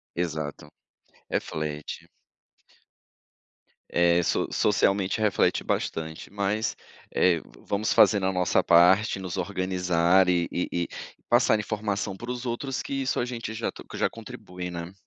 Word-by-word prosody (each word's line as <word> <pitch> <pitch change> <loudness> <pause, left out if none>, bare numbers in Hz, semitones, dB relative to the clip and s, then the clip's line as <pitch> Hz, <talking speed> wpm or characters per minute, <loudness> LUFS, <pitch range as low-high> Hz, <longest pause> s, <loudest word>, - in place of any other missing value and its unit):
Exato, 80 -4 -4 0.6
reflete. 75 -1 -4 1.8
É, 85 0 +3
so - - 0
socialmente 100 -1 +2
reflete 105 -2 +2
bastante, 80 +2 -3
mas, 100 +2 -1 0.4
eh, 85 -3 +3 0.2
vamos 105 +2 -1
fazendo 100 -3 +5
a 95 - +2
nossa 90 -1 +2
parte, 95 +4 +5
nos 95 -2 -5
organizar 90 -1 +2
e 85 -1 +2
e 90 - -1 0.2
e - - -4 0.4
passar 120 -3 +4
informação 105 -2 -2
para 120 +3 -5
os 125 0 -5
outros, 130 +3 -3
que - - -6
isso 130 - 0
a 120 - 0
gente 115 -3 -5
já 115 +1 -2
t - - -12
que - - -10
já - - +2
contribui, 90 0 -8
né. 85 +2 -6
95 Hz, 135 wpm, -26 LUFS, 85-105 Hz, 1.8 s, fazendo